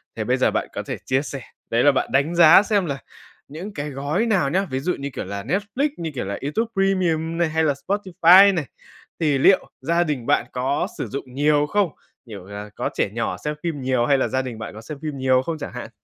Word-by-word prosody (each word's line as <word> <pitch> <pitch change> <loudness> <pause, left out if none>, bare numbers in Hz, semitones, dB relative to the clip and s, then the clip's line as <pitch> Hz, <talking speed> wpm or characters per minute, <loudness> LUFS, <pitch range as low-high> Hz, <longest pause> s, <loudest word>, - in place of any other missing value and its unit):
Thì - - -3
bây - - +1
giờ - - +2
bạn - - -1
có - - -4
thể - - -4
chia 130 +1 +1
sẻ 140 -2 -6 0.3
đấy 115 +1 +2
là 145 - +6
bạn 135 - -1
đánh 140 +6 +1
giá 170 +3 +8
xem 205 -3 +1
là 140 -3 -3 0.5
những 175 +9 -8
cái 145 +1 -4
gói 145 - -1
nào 190 -12 +2
nhá, 190 +5 +1
ví 130 0 -2
dụ 180 +6 -1
như, 140 - -4
kiểu, - - -5
là 100 +1 -5
Netflix, 205 - -1
như, 165 -2 -4
kiểu, 125 - -3
là 100 +1 -4
YouTube 150 +12 -1
Premium 175 -4 0
này, 170 -2 +1
hay 160 +1 +1
là 145 -3 +2
Spotify 195 0 +6
này, 165 -5 -2 0.5
thì 150 -4 +2
liệu 185 +8 +4
gia 170 +5 +2
đình 145 -7 -3
bạn 115 - +2
có 130 +3 -1
sử - - -3
dụng 135 -2 -7
nhiều 145 +2 +2
không? 205 -1 +1 0.4
Kiểu 100 -6 -10
là, 100 +1 -8
có - - -2
trẻ - - 0
nhỏ 115 0 -2
xem 150 0 -1
phim 160 -5 -3
nhiều 130 -2 +1
hay 140 0 +3
là - - +1
gia 130 0 0
đình 125 -4 -7
bạn 110 - -7
có 110 - -10
xem 150 +5 -8
phim 150 -3 -4
nhiều 130 -1 +3
không 160 +4 -4
chẳng 155 - -7
hạn? - - -7
150 Hz, 245 wpm, -22 LUFS, 130-175 Hz, 0.5 s, giá